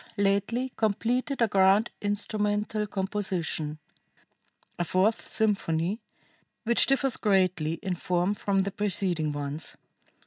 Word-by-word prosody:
lately 200 +6 +1
completed 235 +5 0
a - - +4
grand 195 +2 +4
instrumental 210 +1 -1
composition, 190 -6 -2 1.0
a - - +2
fourth 190 +6 +1
symphony, 200 -2 0 0.6
which 235 0 +3
differs 270 -1 +2
greatly 185 -6 +2
in 190 - -1
form 180 +2 0
from 200 -1 0
the 200 - -3
preceding 180 -6 -1
ones. 145 +1 -5
200 Hz, 105 wpm, -28 LUFS, 180-215 Hz, 1.0 s, a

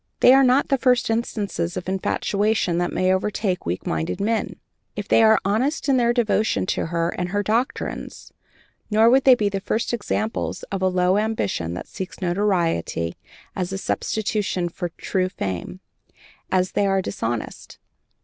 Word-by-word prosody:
They 250 - +8
are 270 0 +6
not 260 +2 +3
the 275 - +2
first 250 -3 +2
instances 205 -6 -2
of 180 - -5
infatuation 195 -1 0
that 175 - -1
may 185 0 +2
overtake 190 - -1
weak 90 +2 -3
minded 80 - -2
men, 220 +3 -1 0.4
if - - -5
they - - +4
are 220 0 +6
honest 250 +12 0
in 270 -2 +4
their 235 -1 +3
devotion 220 -4 +1
to - - -2
her 170 0 0
and 180 0 -3
her 205 +2 -1
doctrines; 230 +6 -3 0.6
nor 220 +2 +5
would 265 +1 +4
they 260 -2 +8
be 210 -4 0
the 195 -1 -2
first 225 +4 -1
examples 220 -1 -2
of 195 -1 -2
a 190 - +3
low 185 +1 +2
ambition 100 - -2
that 90 - -7
seeks 185 -1 -7
notoriety 175 - 0 0.4
as 185 -1 -2
a 195 - -2
substitute 195 -3 -1
for 175 - -4
true 185 +2 -2
fame, 100 - -5 0.7
if 185 0 +1
they 200 - +2
are 195 -1 +1
dishonest. 115 -6 -4
195 Hz, 165 wpm, -23 LUFS, 180-220 Hz, 0.7 s, They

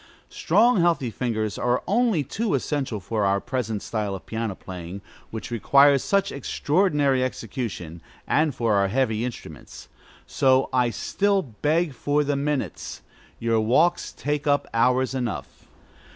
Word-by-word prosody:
Strong, 240 -5 +3
healthy 165 -8 +1
fingers 110 -2 -2
are 125 +1 +1
only 215 -6 +2
too 200 - -1
essential 135 -4 -2
for 105 +2 -2
our 100 0 +2
present 115 -3 -3
style 105 -3 -2
of 95 - -10
piano 110 -3 -3
playing, 90 +1 -8 0.3
which 110 +1 -7
requires 140 +4 +4
such 200 0 +1
extraordinary 145 -1 +1
execution, 105 -9 -5 0.2
and 155 -2 +1
for 115 -2 +1
our 100 -1 +3
heavy 110 0 0
instruments. 125 -1 -8 0.4
So 130 0 +2
I 125 -2 +3
still 200 - 0
beg 150 +6 -1
for 145 +3 0
the 145 0 0
minutes: 140 - -3 0.3
your 115 -1 +1
walks 130 +11 +2
take 145 +1 -3
up 145 0 +2
hours 125 +3 +2
enough. 120 -5 -5
130 Hz, 135 wpm, -24 LUFS, 110-145 Hz, 0.4 s, requires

